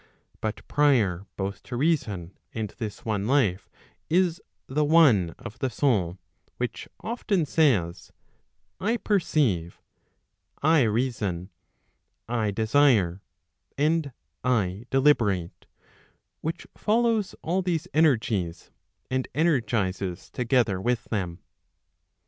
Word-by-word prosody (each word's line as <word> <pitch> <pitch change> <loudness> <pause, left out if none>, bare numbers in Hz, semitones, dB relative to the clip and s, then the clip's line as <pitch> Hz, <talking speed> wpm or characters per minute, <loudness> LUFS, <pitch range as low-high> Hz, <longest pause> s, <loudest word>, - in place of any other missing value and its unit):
But 110 0 -4
prior 110 -11 +2
both 100 +1 -3
to 125 - -7
reason 115 - 0 0.2
and 110 -2 -3
this 110 -3 -6
one 105 -2 -1
life, 115 -9 +1 0.4
is 175 0 +2 0.2
the 150 +3 0
one 140 - +5
of 115 - -10
the 135 -2 0
soul, 105 - +1 0.4
which 125 -1 -4
often 215 -7 -1
says, 120 - +1 0.7
I 220 +6 +1
perceive, 145 - 0 0.8
1 150 -5 +4
reason, 105 -6 -1 0.8
I 115 -3 0
desire, 110 -4 +3 0.6
and 150 0 +1 0.3
I 110 -3 0
deliberate, 105 - +2 0.7
which 160 +2 -4
follows 225 -1 +1
all 180 +4 0
these 175 -2 -1
energies 110 - +1 0.4
and 130 0 0
energizes 110 - 0
together 115 -6 +1
with 120 +2 0
them. 90 -5 -2
120 Hz, 100 wpm, -26 LUFS, 100-150 Hz, 0.8 s, one